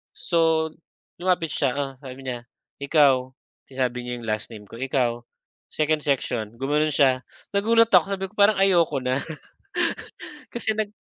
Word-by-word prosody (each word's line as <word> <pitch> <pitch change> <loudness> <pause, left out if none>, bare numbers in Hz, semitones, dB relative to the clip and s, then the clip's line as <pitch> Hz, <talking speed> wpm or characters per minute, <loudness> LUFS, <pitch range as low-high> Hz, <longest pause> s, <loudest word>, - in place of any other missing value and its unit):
So, 160 -2 +2 0.5
lumapit 180 -2 +1
siya, 135 -1 -1
sabi 130 0 -8
niya, 125 -3 -5 0.4
"ikaw," 135 -4 +3 0.3
sinabi 125 -2 -2
niya 125 0 -5
yung 115 - -8
last 110 +2 -2
name 105 -2 -11
ko, 115 - -10
"ikaw, 120 -2 -1 0.5
second 155 -1 0
section," 120 -6 -1
gumano'n 150 +3 +1
siya. 130 -3 +3 0.3
Nagulat 230 +3 +4
ako, 180 -6 +6
sabi 190 0 -2
ko 210 - -27
parang 205 0 +4
ayoko 170 -7 +3
na 130 +2 -1 1.3
kasi 235 -2 0
nag 215 -1 -2
140 Hz, 140 wpm, -24 LUFS, 125-170 Hz, 1.3 s, ako